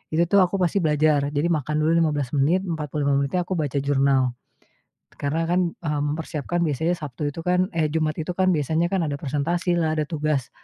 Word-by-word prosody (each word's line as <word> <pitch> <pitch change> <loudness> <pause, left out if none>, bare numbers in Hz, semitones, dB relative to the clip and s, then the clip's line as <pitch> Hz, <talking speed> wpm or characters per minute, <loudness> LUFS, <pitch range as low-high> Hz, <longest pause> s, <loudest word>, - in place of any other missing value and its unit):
itu, 170 - +4
tuh, 200 - +6
aku 185 0 +3
pasti 185 0 +1
belajar, 150 -3 +2
jadi 145 +3 0
makan 150 -1 -1
dulu 160 - +3
15 150 -6 +1
menit, 155 +6 +2
45 150 -5 -1
menit 140 +4 -2
aku 180 +1 -1
baca 145 -2 -1
jurnal, 135 -2 +2 0.9
karena 155 +4 -1
kan, 180 +1 +3
eee, 150 -3 -3
mempersiapkan 155 +2 -2
biasanya 160 +4 0
Sabtu 150 0 -5
itu 165 - -7
kan, 180 +1 +2
eh, 160 -2 +2
Jumat 155 -1 0
itu 160 +2 -3
kan 185 0 +2
biasanya 160 +3 +1
kan 190 -2 0
ada 145 - -2
persentasi 165 +5 -1
lah, 160 -1 +1
ada - - +2
tugas, 150 -5 -1
155 Hz, 190 wpm, -23 LUFS, 145-170 Hz, 0.9 s, tuh